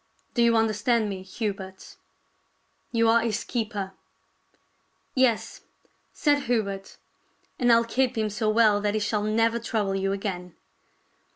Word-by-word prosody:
Do 240 - +1
you 235 0 +4
understand 225 0 +1
me, 190 -2 -5
Hubert? 190 -1 -6 1.0
You 230 -1 +2
are 230 +1 +5
his 225 -2 -1
keeper." 210 -5 -3 0.6
" - - -42 0.5
Yes," 255 -4 +1 0.5
said 290 -2 +2
Hubert, 200 -5 -2 0.3
" - - -41
and 245 -1 +4
I'll 230 0 +5
keep 250 +1 0
him 215 -1 0
so 215 +1 -1
well 215 -2 +4
that 205 0 0
he - - +1
shall 210 0 0
never 225 +2 +1
trouble 215 -3 -1
you 195 0 0
again." 180 -3 -4
215 Hz, 145 wpm, -26 LUFS, 200-230 Hz, 1.0 s, are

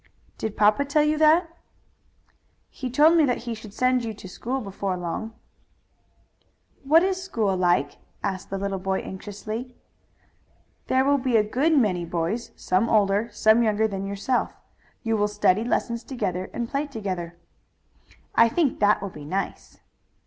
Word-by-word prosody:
"Did 220 -1 -4
papa 210 +6 +4
tell 285 +2 +2
you 305 0 +1
that?" 325 +2 +4 1.2
"He 260 - -5
told 300 +7 +5
me 325 - +5
that 245 -3 -1
he 235 - -3
should 220 -2 -10
send 255 +3 +1
you 225 -2 -4
to 195 - -11
school 245 +8 -4
before 195 -4 -3
long." 180 +6 -5 1.5
"What 315 +5 +5
is 375 0 0
a - - -7
school 220 - -1
like?" 175 -5 +1 0.2
asked 185 -1 -3
the 195 - -3
little 195 0 -3
boy 190 0 -1
anxiously. 215 +5 -7 1.1
"There 260 +1 +2
will 285 0 +3
be 250 -2 +2
a 215 - +4
good 280 +9 +1
many 190 -9 +2
boys, 170 +7 -2
some 190 +5 0
older, 210 +1 +2
some 220 +2 +4
younger 220 -1 +2
than 195 -2 -4
yourself. 200 +6 -1 0.5
You 225 -1 0
will 210 0 +2
study 205 0 +2
lessons 235 0 -1
together 190 -8 -3
and 235 -1 -3
play 280 +4 -2
together." 185 -9 -5 1.0
"I 230 0 +5
think 300 +1 0
that 205 -1 +3
will 200 - -5
be 150 - -10
nice." 190 +7 -5
220 Hz, 160 wpm, -25 LUFS, 195-255 Hz, 1.5 s, told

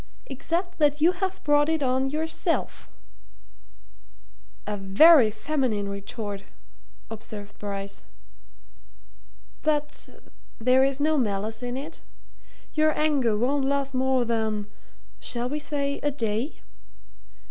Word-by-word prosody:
"Except 340 +7 -3
that 295 -1 +3
you 325 +4 +5
have 380 +1 -3
brought 295 0 +3
it 320 -2 +1
on 260 +1 +1
yourself." 320 +3 -2 1.8
"A 210 - -2
very 220 - +6
feminine 220 -2 -1
retort!" 200 0 -5 0.7
observed 210 -2 -8
Bryce. 200 -1 -5 1.6
"But 300 -1 -1 0.5
there 255 +3 +4
is 270 0 +1
no 305 +1 +2
malice 215 0 -2
in 245 +1 -3
it? 300 +4 -8 0.7
Your 310 0 +2
anger 280 -8 +2
won't 270 +5 +1
last 275 0 0
more 260 -1 +2
than 220 -2 -1 0.5
shall 240 0 0
we 295 +4 -2
say 285 -1 -2
a 290 - 0
day?" 235 0 -2
265 Hz, 110 wpm, -26 LUFS, 220-295 Hz, 1.8 s, very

